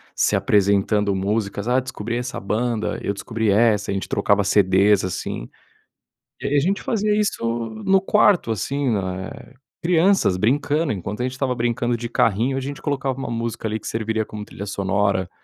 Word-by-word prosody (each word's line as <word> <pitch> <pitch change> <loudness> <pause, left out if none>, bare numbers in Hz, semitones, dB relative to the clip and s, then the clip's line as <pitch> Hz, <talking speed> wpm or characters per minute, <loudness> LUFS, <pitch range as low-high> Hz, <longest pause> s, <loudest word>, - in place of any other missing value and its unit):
se - - +2
apresentando 100 0 +2
músicas. 100 +2 -2
"Ah, 125 +1 +3
descobri 115 -2 -5
essa 125 +1 -4
banda", 110 +2 -1
"Eu 100 - -1
descobri 110 +1 -2
essa", 105 -1 +3
a - - -1
gente 95 - -3
trocava 100 0 +2
CDs 100 0 +4
assim. 90 -9 -4 0.9
E - - -2
a - - +6
gente 190 +7 0
fazia 210 -2 0
isso 210 -1 0 0.4
no 195 0 +4
quarto. 195 - +3
Assim, 135 +6 -1
na 95 -1 -2 0.5
crianças 175 - +3
brincando. 145 - +1
Enquanto 105 +3 -4
a - - 0
gente 125 - -1
estava 130 -1 -1
brincando 120 0 0
de 120 0 -5
carrinho, 115 +4 +1
a - - 0
gente 140 +1 -6
colocava 135 -2 -2
uma 135 -3 -4
música 115 -1 -3
ali 110 +1 -2
que - - -9
serviria 110 0 -1
como 105 -1 -7
trilha 100 - -8
sonora. 100 -1 0
115 Hz, 170 wpm, -22 LUFS, 100-130 Hz, 0.9 s, a